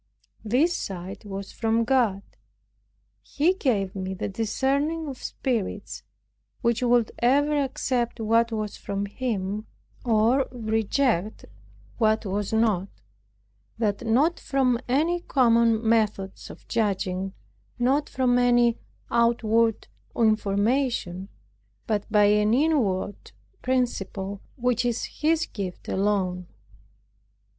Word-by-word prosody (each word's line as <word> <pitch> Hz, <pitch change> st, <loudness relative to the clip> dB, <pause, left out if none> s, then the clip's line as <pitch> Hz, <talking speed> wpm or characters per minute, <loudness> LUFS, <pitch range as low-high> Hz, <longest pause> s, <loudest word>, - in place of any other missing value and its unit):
This 270 Hz, +11 st, +2 dB
sight 190 Hz, +2 st, -6 dB
was 195 Hz, -1 st, -6 dB
from 225 Hz, 0 st, +1 dB
God. 230 Hz, -6 st, +1 dB, 1.0 s
He 330 Hz, +6 st, +1 dB
gave 210 Hz, -, 0 dB
me 190 Hz, 0 st, -4 dB
the -, -, -3 dB
discerning 275 Hz, +9 st, -1 dB
of 265 Hz, -3 st, -7 dB
spirits, 215 Hz, -5 st, -3 dB, 0.6 s
which 235 Hz, -1 st, +1 dB
would 240 Hz, -2 st, +3 dB
ever 285 Hz, +5 st, +3 dB
accept 255 Hz, -4 st, -1 dB
what 230 Hz, +1 st, +2 dB
was 215 Hz, -2 st, -3 dB
from 200 Hz, 0 st, -3 dB
Him, 210 Hz, -2 st, -3 dB, 0.4 s
or 235 Hz, +3 st, +3 dB
reject 220 Hz, -2 st, 0 dB, 0.5 s
what 220 Hz, -1 st, +2 dB
was 200 Hz, +1 st, -2 dB
not; 220 Hz, -4 st, +2 dB, 0.9 s
that 210 Hz, -3 st, -1 dB
not 275 Hz, +9 st, +2 dB
from 260 Hz, -3 st, +1 dB
any 315 Hz, +8 st, +1 dB
common 230 Hz, -6 st, +3 dB
methods 210 Hz, -4 st, 0 dB
of -, -, -13 dB
judging, 195 Hz, -3 st, -1 dB, 0.4 s
not 265 Hz, +4 st, +1 dB
from 250 Hz, -1 st, +2 dB
any 240 Hz, -1 st, +3 dB, 0.3 s
outward 230 Hz, -1 st, +2 dB, 0.3 s
information, 215 Hz, -2 st, +1 dB, 0.6 s
but 215 Hz, -2 st, -2 dB
by 210 Hz, -1 st, +5 dB
an 210 Hz, +2 st, +4 dB
inward 245 Hz, -10 st, 0 dB, 0.3 s
principle 205 Hz, -6 st, -2 dB
which 245 Hz, -2 st, 0 dB
is 240 Hz, -1 st, -1 dB
His 320 Hz, +1 st, 0 dB
gift 190 Hz, -4 st, -7 dB
alone. 190 Hz, -3 st, 0 dB
225 Hz, 105 wpm, -25 LUFS, 205-255 Hz, 1.0 s, by